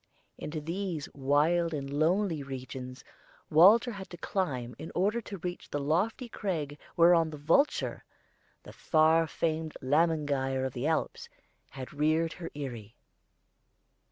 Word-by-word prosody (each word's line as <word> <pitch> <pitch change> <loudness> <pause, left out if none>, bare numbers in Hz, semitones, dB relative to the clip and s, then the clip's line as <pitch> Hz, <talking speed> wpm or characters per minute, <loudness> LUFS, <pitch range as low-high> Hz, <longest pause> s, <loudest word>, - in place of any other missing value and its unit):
Into 155 +1 -4
these 170 0 -4
wild 155 +5 +2
and 140 -2 -4
lonely 160 +4 +1
regions 130 -1 -7 0.5
Walter 200 +10 +6
had 195 -3 -8
to 175 - -9
climb 135 -10 -2
in 160 - -7
order 205 +6 +1
to 205 -2 -8
reach 175 0 -6
the 145 - -2
lofty 180 - 0
crag 155 -10 -4 0.2
whereon 170 -1 +5
the 155 - -8
vulture 165 - +1 0.6
the - - -12
far 160 +1 +3
famed 160 -1 -2
Lämmergeier 145 -2 +1
of 130 - -4
the 125 +3 -2
Alps 160 - -2 0.4
had 130 0 -9
reared 155 +2 +1
her 170 -2 -7
eyrie. 120 -7 -7
155 Hz, 130 wpm, -30 LUFS, 140-175 Hz, 0.6 s, Walter